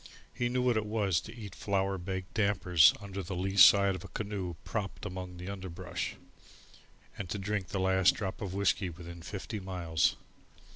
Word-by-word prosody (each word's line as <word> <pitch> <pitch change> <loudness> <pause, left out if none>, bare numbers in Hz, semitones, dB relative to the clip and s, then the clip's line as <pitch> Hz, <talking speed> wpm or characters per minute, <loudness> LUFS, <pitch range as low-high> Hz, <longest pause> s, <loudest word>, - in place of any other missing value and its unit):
He 120 -1 -1
knew 125 0 0
what 125 -3 +3
it 110 - 0
was 105 -5 +1
to 110 - -10
eat 105 -4 -8
flour 95 -1 -1
baked 95 +1 -5
dampers 95 -7 +5
under 100 -1 -6
the 95 +1 -5
lee 95 +2 -2
side 100 0 +8
of 90 -1 -6
a - - -8
canoe 100 -5 -4
propped 100 -3 -4
among 90 0 -6
the 90 +1 -7
underbrush, 95 -2 -5 1.0
and 95 -3 -4
to 100 - -2
drink 100 -1 -2
the 95 - -3
last 95 -1 +4
drop 95 -3 -4
of 95 -2 -4
whiskey 100 -1 +1
within 85 0 -9
fifty 105 +4 -5
miles. 90 -4 0
95 Hz, 180 wpm, -31 LUFS, 90-100 Hz, 1.0 s, side